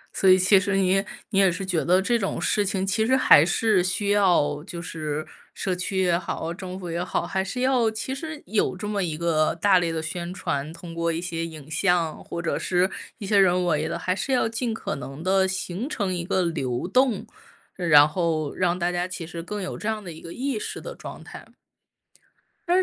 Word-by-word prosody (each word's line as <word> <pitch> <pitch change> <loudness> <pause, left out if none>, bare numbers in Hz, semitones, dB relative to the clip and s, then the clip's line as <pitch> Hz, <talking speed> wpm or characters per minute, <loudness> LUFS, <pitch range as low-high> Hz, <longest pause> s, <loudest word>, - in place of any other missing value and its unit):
所 190 - +3
以 185 - +8
其 190 +1 +5
实 200 0 0
你 190 -1 +2
也 195 +2 +2 0.3
你 195 - +2
也 195 -2 +5
是 185 +3 -4
觉 180 -4 0
得 180 +2 +4
这 235 +4 +1
种 195 - -2
事 210 - +1
情 190 -1 -1
其 220 +3 +1
实 260 - +3
还 145 - +7
是 195 0 +2
需 200 +3 -1
要 175 -8 +3
就 170 -1 -7
是 155 -3 -4 0.3
社 185 -2 -1
区 190 +1 -1
也 175 -2 +3
好、 170 -1 -4
政 185 +1 -7
府 180 - -6
也 170 +1 -2
好， 180 - -2
还 190 0 -1
是 250 +6 -4
要 255 -3 +3
其 220 +4 -4
实 310 +2 -6
有 210 +2 +1
这 210 - -5
么 205 -1 -1
一 160 -3 -2
个 160 -2 +1
大 190 +2 +4
力 170 -1 -1
的 160 - -2
宣 170 +2 -4
传， 150 -5 -3
通 170 0 -10
过 170 0 0
一 165 - -2
些 165 -2 -3
影 155 -3 -10
像 170 -1 +1
或 170 - -5
者 170 - -1
是 180 +1 +1 0.3
一 205 - -6
些 200 +1 +2
人 180 -1 +4
为 160 -2 +1
的， - - -3
还 185 - -1
是 270 - -3
要 250 -3 +3
尽 230 +1 -2
可 - - -4
能 140 +3 -8
地 190 0 +3
形 190 +5 -3
成 200 -9 -2
一 175 -1 -2
个 185 +1 0
流 135 -5 -2
动， 250 -1 +2 0.5
然 150 -5 +6
后 160 -3 -1
让 180 -1 +1
大 175 +1 +1
家 175 +1 -1
其 185 -2 -6
实 170 0 -6
更 205 +2 -5
有 185 - -5
这 210 - -5
样 215 -1 -3
的 175 - -7
一 160 - -11
个 170 - -9
意 260 -3 -2
识 - - -5
的 - - -7
状 - - -9
态。 - - -11 1.2
但 355 - +4
185 Hz, 245 characters per minute, -25 LUFS, 170-200 Hz, 1.2 s, 以